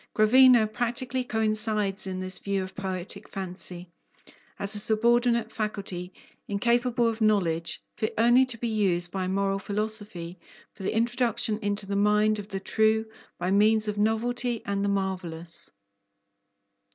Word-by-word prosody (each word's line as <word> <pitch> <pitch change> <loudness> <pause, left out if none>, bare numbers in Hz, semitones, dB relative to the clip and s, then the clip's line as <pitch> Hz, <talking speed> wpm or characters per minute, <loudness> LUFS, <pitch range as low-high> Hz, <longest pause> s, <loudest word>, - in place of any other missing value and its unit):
Gravina 240 +1 +6
practically 240 +3 -2
coincides 215 -3 +2
in 185 -1 -4
this 185 0 0
view 200 -1 -2
of 185 - -9
poetic 190 +1 -6
fancy, 180 -2 -3 0.7
as 200 +1 +2
a 210 - +3
subordinate 235 +2 +2
faculty, 195 -4 -5 0.4
incapable 235 +3 +1
of 225 0 -3
knowledge, 175 -6 0
fit 215 +1 -1
only 240 +3 +5
to 250 -3 -2
be 235 - -3
used 185 -6 +1
by 190 -1 -3
moral 195 +1 0
philosophy 205 -4 -3 0.3
for - - -14
the 190 - -2
introduction 230 -2 0
into 205 -1 -2
the 200 +1 -3
mind 210 +1 +2
of 200 - -7
the 195 -2 -4
true, 220 +2 +1 0.3
by 180 +1 -2
means 215 +2 +3
of 210 0 -3
novelty 235 +2 -1
and 200 0 -2
the 200 - 0
marvellous. 180 -4 -4
210 Hz, 140 wpm, -26 LUFS, 195-225 Hz, 0.7 s, Gravina